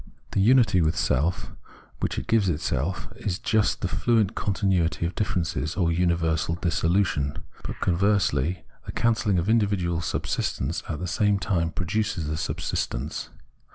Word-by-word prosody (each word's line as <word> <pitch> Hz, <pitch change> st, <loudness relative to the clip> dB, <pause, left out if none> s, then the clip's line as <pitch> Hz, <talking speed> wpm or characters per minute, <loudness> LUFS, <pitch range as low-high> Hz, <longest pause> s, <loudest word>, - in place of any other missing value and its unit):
The 100 Hz, -, +1 dB
unity 115 Hz, -4 st, +5 dB
with 80 Hz, 0 st, +2 dB
self, 75 Hz, +7 st, 0 dB, 0.5 s
which -, -, -2 dB
it -, -, -3 dB
gives 110 Hz, -4 st, +2 dB
itself, 80 Hz, +2 st, -1 dB
is 95 Hz, -4 st, -2 dB
just 110 Hz, -1 st, +1 dB
the -, -, 0 dB
fluent 110 Hz, -5 st, +2 dB
continuity 95 Hz, -4 st, 0 dB
of 85 Hz, -, -2 dB
difier 100 Hz, -4 st, 0 dB
ences, 75 Hz, -3 st, -3 dB
or 85 Hz, -2 st, +3 dB
universal 85 Hz, -2 st, +1 dB
dissolution. 85 Hz, -4 st, +1 dB, 0.3 s
But, -, -, -6 dB
conversely, 90 Hz, -3 st, +1 dB, 0.2 s
the -, -, -5 dB
cancelling 115 Hz, -4 st, +2 dB
of 85 Hz, +2 st, 0 dB
individual 100 Hz, -7 st, +1 dB
subsistence 75 Hz, -1 st, -2 dB
at 80 Hz, -, -2 dB
the 90 Hz, -, -4 dB
same 100 Hz, +3 st, +2 dB
time 85 Hz, -5 st, 0 dB
produces 95 Hz, 0 st, -1 dB
the 75 Hz, +1 st, -2 dB
subsistence. 70 Hz, -1 st, -3 dB
90 Hz, 145 wpm, -26 LUFS, 80-100 Hz, 0.5 s, unity